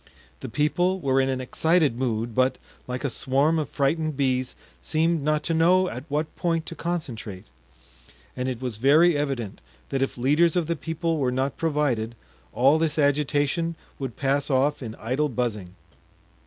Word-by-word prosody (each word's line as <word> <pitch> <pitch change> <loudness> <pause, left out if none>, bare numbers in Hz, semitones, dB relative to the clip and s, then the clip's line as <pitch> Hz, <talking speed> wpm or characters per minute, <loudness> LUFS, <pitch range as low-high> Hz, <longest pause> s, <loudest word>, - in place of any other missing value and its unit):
The - - -6
people 175 +8 +1
were 135 -4 +2
in 135 - 0
an 130 -1 -1
excited 155 +2 +2
mood, 120 -2 -2
but, 130 +3 +2 0.3
like 125 +2 -4
a 140 - 0
swarm 140 +7 +1
of 150 - -3
frightened 155 +1 0
bees, 130 -2 0 0.3
seemed 165 0 +1
not 150 +1 0
to 165 - -1
know 180 +3 +4
at 125 +3 -7
what 150 +2 -2
point 165 -2 -1
to 165 - -6
concentrate; 130 - -4 0.9
and 125 0 -2
it 125 -3 -4
was 125 -4 -4
very 155 +8 +5
evident 135 -8 -3 0.3
that 135 - -1
if 135 - -1
leaders 150 +7 +3
of 175 -2 +1
the 170 +2 -1
people 165 +1 -2
were 130 -3 +1
not 130 +2 -1
provided 140 -8 0 0.4
all 140 +5 +4
this 160 -2 0
agitation 145 +3 +1 0.2
would 130 -4 -5
pass 140 +1 0
off 140 +2 +2
in 115 -3 -6
idle 130 +6 -1
buzzing. 110 -7 -3
140 Hz, 170 wpm, -25 LUFS, 130-160 Hz, 0.9 s, very